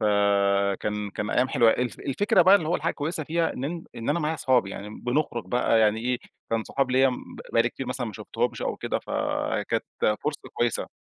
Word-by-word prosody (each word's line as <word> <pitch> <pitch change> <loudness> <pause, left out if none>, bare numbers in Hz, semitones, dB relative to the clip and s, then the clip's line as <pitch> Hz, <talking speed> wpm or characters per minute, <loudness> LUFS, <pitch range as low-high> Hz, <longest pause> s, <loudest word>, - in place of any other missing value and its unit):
فكان 100 0 +1
كان 105 +1 -4
أيّام 125 +1 +2
حلوة. 120 -5 +5
الف 125 0 -1
الفكرة 180 +6 +3
بقى 190 +3 +7
اللي 170 -6 +2
هو 175 - +2
الحاجة 165 +2 -1
الكويّسة 155 +1 -3
فيها، 165 +1 0
إن 130 - -5
أنت 165 +3 -4
إن 115 - -5
أنا 160 - +1
معايا 155 +2 0
أصحابي 125 -8 +2
يعني 100 +2 -7
بنخرج 125 -3 -1
بقى 115 +1 +2
يعني 110 0 +3
إيه، 125 +1 0 0.3
كان 115 -1 0
صحاب 135 -2 -1
ليّا 130 +1 +5
م 125 - -2 0.4
بقى 115 - +5
لي 120 - +1
كتير 130 +2 -7
مثلًا 125 -1 -2
ما 110 - -6
شفتهمش - - -3
أو - - -2
كده، - - -2
فكانت - - -1 0.4
فرصة 150 0 -1
كويّسة. 120 -1 0
125 Hz, 205 wpm, -26 LUFS, 105-150 Hz, 0.4 s, بقى